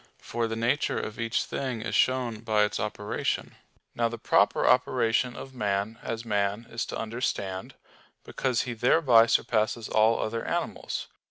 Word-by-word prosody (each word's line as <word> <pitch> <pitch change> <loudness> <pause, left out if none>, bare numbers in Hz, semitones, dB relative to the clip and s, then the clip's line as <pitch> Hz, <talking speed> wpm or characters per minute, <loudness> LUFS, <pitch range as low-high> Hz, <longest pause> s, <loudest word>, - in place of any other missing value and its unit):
For 115 0 -3
the 115 - -3
nature 120 +6 0
of 110 - -6
each 115 -1 0
thing 125 -5 -4
is 115 - -4
shown 125 -4 +1
by 110 -2 +2
its 105 - -1
operation. 105 0 -2 0.4
Now 115 0 +1
the 115 - -6
proper - - +2
operation 120 +2 +2
of 135 - -9
man 105 -1 -2
as 115 0 -4
man 105 +1 0
is 115 - -3
to - - -4
understand; 110 -5 -3 0.5
because 130 -3 -1
he 125 - -4
thereby 120 -1 +5
surpasses 110 0 +1
all 110 +1 +3
other 115 +1 -2
animals. - - -3
115 Hz, 155 wpm, -27 LUFS, 110-120 Hz, 0.5 s, thereby